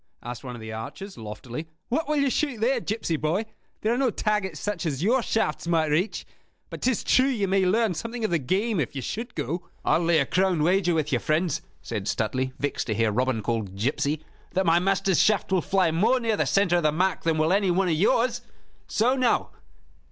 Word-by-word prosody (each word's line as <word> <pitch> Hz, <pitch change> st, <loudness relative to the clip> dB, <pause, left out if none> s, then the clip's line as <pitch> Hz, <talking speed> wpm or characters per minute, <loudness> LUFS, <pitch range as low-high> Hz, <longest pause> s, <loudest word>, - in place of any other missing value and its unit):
asked 120 Hz, +2 st, -7 dB
one 125 Hz, -2 st, -6 dB
of -, -, -9 dB
the 110 Hz, 0 st, -7 dB
archers, 150 Hz, -, -7 dB
loftily. 115 Hz, +7 st, -7 dB, 0.2 s
"What 300 Hz, +5 st, -1 dB
will 305 Hz, -, +2 dB
you 280 Hz, -2 st, +2 dB
shoot 280 Hz, -6 st, -1 dB
there, 245 Hz, +3 st, +2 dB
gipsy 215 Hz, -7 st, -2 dB
boy? 165 Hz, +9 st, 0 dB, 0.4 s
There 220 Hz, +2 st, +1 dB
are 245 Hz, -, -1 dB
no 270 Hz, -2 st, +3 dB
targets 210 Hz, -7 st, -1 dB
such 205 Hz, -4 st, -3 dB
as 145 Hz, 0 st, -2 dB
your 245 Hz, +6 st, +3 dB
shafts 195 Hz, -8 st, -1 dB
might 160 Hz, -3 st, +2 dB
reach. 175 Hz, +8 st, 0 dB, 0.5 s
But -, -, -7 dB
'tis 255 Hz, -4 st, +1 dB
true 260 Hz, +1 st, +4 dB
that 270 Hz, -, 0 dB
you 200 Hz, -3 st, 0 dB
may 190 Hz, 0 st, +2 dB
learn 220 Hz, +1 st, +2 dB
something 230 Hz, +6 st, -4 dB
of 215 Hz, -, -1 dB
the 170 Hz, -, +2 dB
game, 195 Hz, -, 0 dB
if 145 Hz, 0 st, -2 dB
you 135 Hz, -, -4 dB
should 230 Hz, -, -5 dB
go." 160 Hz, +4 st, -3 dB, 0.2 s
"I'll -, -, +3 dB
lay 170 Hz, -1 st, +3 dB
a 140 Hz, -, +3 dB
crown 180 Hz, 0 st, +1 dB
wager 180 Hz, 0 st, +2 dB
with 155 Hz, -2 st, -1 dB
you, 125 Hz, -, +3 dB
friends," 160 Hz, +3 st, 0 dB, 0.2 s
said 105 Hz, -3 st, -4 dB
Stuteley, 130 Hz, +4 st, -1 dB
vexed 145 Hz, -4 st, -2 dB
to 110 Hz, -, -1 dB
hear 115 Hz, 0 st, +2 dB
Robin 125 Hz, 0 st, 0 dB
called 110 Hz, -4 st, -2 dB
"gipsy," 140 Hz, +7 st, -1 dB, 0.3 s
"that 190 Hz, +1 st, +1 dB
my 170 Hz, 0 st, +4 dB
master's 195 Hz, -1 st, +2 dB
shaft 210 Hz, -3 st, +2 dB
will 185 Hz, -2 st, +3 dB
fly 190 Hz, -3 st, +2 dB
more 210 Hz, +10 st, +3 dB
near 225 Hz, -3 st, 0 dB
the -, -, 0 dB
center 190 Hz, -3 st, +3 dB
of -, -, +1 dB
the 155 Hz, -1 st, +3 dB
mark 185 Hz, +5 st, 0 dB
than 165 Hz, -1 st, +1 dB
will 155 Hz, +3 st, +2 dB
any 200 Hz, -1 st, +2 dB
one 185 Hz, +2 st, +2 dB
of 170 Hz, -, +2 dB
yours. 230 Hz, +8 st, +2 dB, 0.5 s
So 245 Hz, +5 st, +2 dB
now." 255 Hz, -3 st, +1 dB
175 Hz, 225 wpm, -26 LUFS, 150-215 Hz, 0.5 s, true